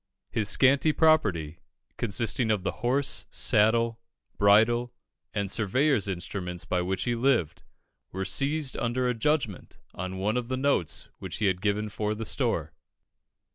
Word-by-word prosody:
His 110 -3 +2
scanty 135 +7 +4
property, 100 - +2 0.4
consisting 115 +2 0
of 105 -4 +1
the - - -1
horse, 130 +3 0
saddle, 115 +1 +2 0.4
bridle, 115 +4 +3 0.4
and 100 -1 -2
surveyor's 120 +3 +1
instruments 90 -1 -4
by 90 - 0
which 95 +1 -2
he 120 - 0
lived, 120 - +1 0.5
were 95 +1 -4
seized 140 +6 -1
under 125 +1 -1
a 125 - +1
judgment 120 - -2 0.2
on 95 +1 -5
one 105 +5 0
of 125 -1 -3
the 130 +1 -2
notes 135 - 0
which - - -6
he 110 - -1
had 90 -2 +1
given 105 +1 0
for 105 0 -3
"the 110 +1 -5
store." - - -1
110 Hz, 145 wpm, -27 LUFS, 100-125 Hz, 0.5 s, scanty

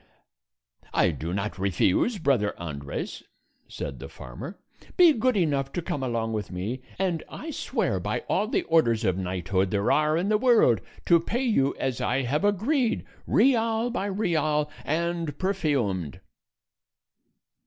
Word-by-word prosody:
"I - - +4
do 80 +2 -5
not 100 +1 -3
refuse, 100 - +2
brother 130 - +1
Andres," 70 -4 -5 0.5
said 70 -3 -6
the - - -8
farmer; 60 - -9 0.4
"be 350 -4 +8
good 250 -1 +1
enough 140 -6 +1
to 175 - -2
come 145 - -3
along 115 -3 -1
with 105 -3 -3
me, 100 +8 -4 0.2
and 180 -4 0
I 320 - -7
swear - - -1
by - - -2
all 215 - 0
the - - 0
orders 120 -9 +2
of 95 -2 +2
knighthood 95 +1 -1
there 100 +1 +1
are 155 +1 +3
in 185 +4 0
the 215 -1 +3
world 230 - +4 0.2
to 170 -1 +6
pay 235 +10 -2
you 140 - +2
as 130 -3 -2
I 130 +2 +1
have 140 +8 0
agreed, 225 - +1 0.2
real 230 -1 +3
by 205 -4 -2
real, 155 -7 0
and 165 -1 -1
perfumed." 135 - -1
150 Hz, 145 wpm, -26 LUFS, -, 0.5 s, be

